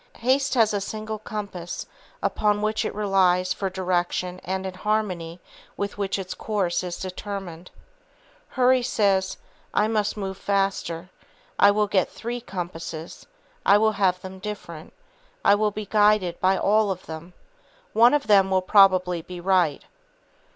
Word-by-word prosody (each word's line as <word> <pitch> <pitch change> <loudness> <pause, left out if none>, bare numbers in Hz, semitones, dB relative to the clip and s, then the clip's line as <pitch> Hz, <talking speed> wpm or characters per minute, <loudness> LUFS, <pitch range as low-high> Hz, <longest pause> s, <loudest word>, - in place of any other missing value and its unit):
Haste 265 +3 +1
has 225 -3 +4
a 205 - -1
single 215 +1 -5
compass 200 -5 -6 0.4
upon 210 0 +1
which 215 0 0
it - - -4
relies 190 -3 +2
for 195 - -3
direction 180 -1 -2
and 190 +1 -3
in 190 - -4
harmony 185 -4 -2 0.4
with 200 0 -3
which 195 -1 -1
its 190 -2 -5
course 195 -5 -1
is 175 -1 -4
determined. 185 -2 -6 0.9
Hurry 255 0 +4
says: 195 -6 +1 0.4
"I 210 - +3
must 215 -1 -1
move 190 -2 -4
faster. 195 -3 -1 0.5
I 200 - +7
will 210 +1 +2
get 195 -2 +1
three 240 +1 -5
compasses; 170 -5 -7 0.4
I 205 - +6
will 220 +1 +3
have 190 -3 +1
them 190 0 -9
different; 185 -6 -7 0.5
I 200 - +7
will 210 +1 +2
be 210 +1 -6
guided 205 -4 +2
by 190 +1 +3
all 215 +1 +2
of 185 -1 -4
them. 160 +3 -9 0.6
One 235 +5 +6
of 290 - 0
them 195 -2 +5
will 190 -1 +2
probably 185 -3 +4
be 180 +2 -9
right." 175 -5 +1
195 Hz, 150 wpm, -24 LUFS, 180-210 Hz, 0.9 s, I